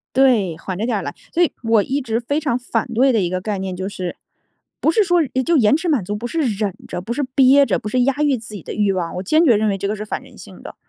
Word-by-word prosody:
对， 230 -11 +3
缓 180 +2 -6
着 215 - -2
点 235 -3 0
儿 - - -3
来。 140 - -5 0.2
所 345 - +1
以 340 - +1
我 225 -2 +3
一 275 +6 -2
直 230 -3 -1
非 285 +5 -1
常 285 -6 0
反 240 -3 -2
对 260 +4 +4
的 225 -4 +2
一 175 - 0
个 185 0 -2
概 205 +1 -3
念 190 -1 -4
就 190 +1 -4
是 185 -3 -5 0.6
不 315 - +2
是 425 - +3
说 350 -2 +3 0.2
就 340 -1 +3
延 220 -1 +4
迟 350 - -4
满 275 -10 +1
足、 205 +3 -4
不 220 +3 -6
是 330 - -3
忍 210 -7 -1
着、 - - -5
不 225 +6 -4
是 285 - -1
憋 275 +1 +6
着， - - 0
不 - - -7
是 250 +3 +1
压 265 +2 +2
抑 290 -3 +2
自 220 -1 -10
己 190 - -8
的 - - -6
欲 205 -2 +1
望， 180 -3 -3
我 180 - -4
坚 310 - +3
决 245 -7 +5
认 215 +1 +1
为 195 - -1
这 200 +1 -3
个 210 - -1
是 215 0 -6
反 - - -4
人 - - -17
性 - - -13
的。 - - -9
225 Hz, 325 characters per minute, -20 LUFS, 195-270 Hz, 0.6 s, 憋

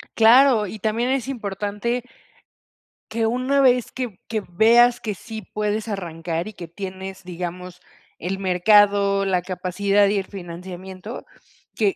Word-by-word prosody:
Claro, 230 -1 +6
y 220 - -7
también 225 +4 0
es 265 -2 0
importante 210 +1 -3 1.1
que 225 0 0
una 255 +4 +1
vez, 250 -3 +3
que 245 -7 -5
que 225 - 0
veas, 235 +6 +4
que 210 -3 -3
sí 220 +2 -8
puedes 210 +1 -1
arrancar, 170 -2 -4
y 215 - -8
que 170 -4 -9
tienes, 190 +1 -7
digamos, 180 0 -6 0.4
el 190 +3 -3
mercado, 200 +1 +4
la 185 -2 +1
capacidad 195 +3 +1
y 200 +1 +1
el 190 - -2
financiamiento. 185 +3 -8 0.5
Que 205 -3 +1
200 Hz, 135 wpm, -22 LUFS, 185-225 Hz, 1.1 s, Claro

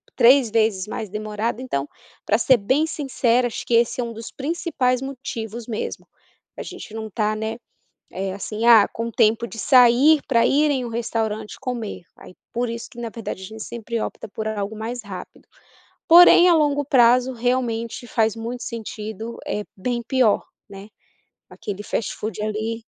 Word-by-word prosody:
3 250 -1 +5
vezes 215 -4 +1
mais 215 -1 -5
demorado 215 +3 -3
então, 145 - -3 0.4
pra 215 - +3
ser 255 +2 +4
bem 260 +9 +1
sincera, 255 -5 +1
acho 235 - -6
que - - -2
esse 235 +1 +2
é - - -1
um 235 -1 -5
dos 225 0 -9
principais 275 -4 -1
motivos 240 -4 -6
mesmo. 225 -3 -5 0.5
A - - -5
gente - - -9
não 220 0 -4
está 215 0 -1
né, 220 +1 -4 0.5
eh, 190 0 -3
assim 210 +3 -4
ah, 225 -4 +7
com 230 +1 -5
tempo 225 +2 +2
de 225 -1 -9
sair 260 +5 +6
pra 235 -3 +3
ir 295 +2 +3
em 260 -3 -1
um - - -5
restaurante 220 -2 -3
comer. 235 -8 -5
Aí - - -14 0.2
por 240 0 -1
isso 230 0 -6
que 270 - -18
na 235 -1 -4
verdade 220 -4 -7
a - - -6
gente 220 +3 -10
sempre 230 +1 -5
opta - - -5
por 220 +2 -5
algo 210 0 -3
mais 230 +2 -5
rápido. 185 -3 -10 0.6
Porém, 350 +1 +8
a - - +6
longo 290 -3 +2
prazo, 250 -2 +4
realmente, 240 -1 -2
faz 225 -2 +1
muito 235 +2 -5
sentido, 220 0 -6
é 210 - -2
bem 235 +4 -2
pior, 255 -6 +2 0.2
né, 200 +1 -11 0.6
aquele 205 0 -6
fast-food 215 0 -4
ali 215 +2 -3
230 Hz, 170 wpm, -22 LUFS, 215-250 Hz, 0.6 s, Porém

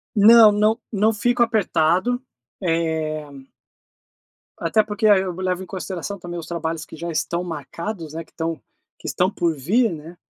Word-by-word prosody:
Não, 220 +1 +8
não. 215 +2 +2
Não 215 +1 +2
fico 240 +3 +1
apertado, 215 0 +2 0.4
eh 160 -3 -1 1.3
até 215 +6 +2
porque 210 +1 0
a 205 -2 +7
eh, 190 - +1
eu 185 - -3
levo 185 0 -2
em - - -8
consideração 190 +1 -5
também 175 0 -6
os 165 - -9
trabalhos 165 -1 -3
que - - -11
já 170 +2 -5
estão 170 +2 -1
marcados, 165 +2 -6
né, 165 +1 -5
que - - -27
estão 165 -1 -3 0.4
que - - -9
estão 185 +3 +1
por 170 -4 0
vir, 210 - +2
né? 160 +3 -10
180 Hz, 170 wpm, -22 LUFS, 165-210 Hz, 1.3 s, Não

